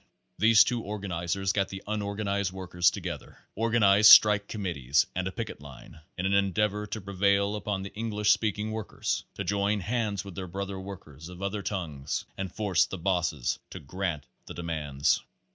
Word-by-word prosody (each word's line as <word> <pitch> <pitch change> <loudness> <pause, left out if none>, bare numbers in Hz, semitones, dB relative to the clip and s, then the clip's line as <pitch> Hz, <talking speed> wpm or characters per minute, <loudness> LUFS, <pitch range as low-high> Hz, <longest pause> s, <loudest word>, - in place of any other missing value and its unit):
These 110 +2 +7
two 120 0 -1
organizers 95 -2 -2
got 100 -1 0
the 95 0 -8
unorganized 100 -2 -2
workers 90 -2 +1
together, - - -7 0.2
organized 105 -2 +5
strike 105 -2 +8
committees 85 - 0
and 95 0 -1
a - - -3
picket 110 - -6
line, 75 +1 -12 0.2
in 95 - -2
an 95 - +1
endeavor 105 +2 +1
to 110 - -4
prevail 100 +1 +1
upon 105 -2 -3
the 100 - -8
English 105 -2 +1
speaking 105 +1 0
workers 110 -1 -3
to - - -3
join 100 +1 0
hands 105 -2 -2
with 100 - -8
their 95 +1 -6
brother 100 +2 -5
workers 85 -5 -10
of 90 +2 -9
other 100 +1 -2
tongues 75 -9 -4
and 95 -2 -4
force 100 -4 +2
the 95 - -6
bosses 85 -7 -1
to - - -8
grant 85 -1 -4 0.2
the - - -8
de 85 - -6
mands. 75 -4 0
100 Hz, 170 wpm, -28 LUFS, 90-105 Hz, 0.2 s, strike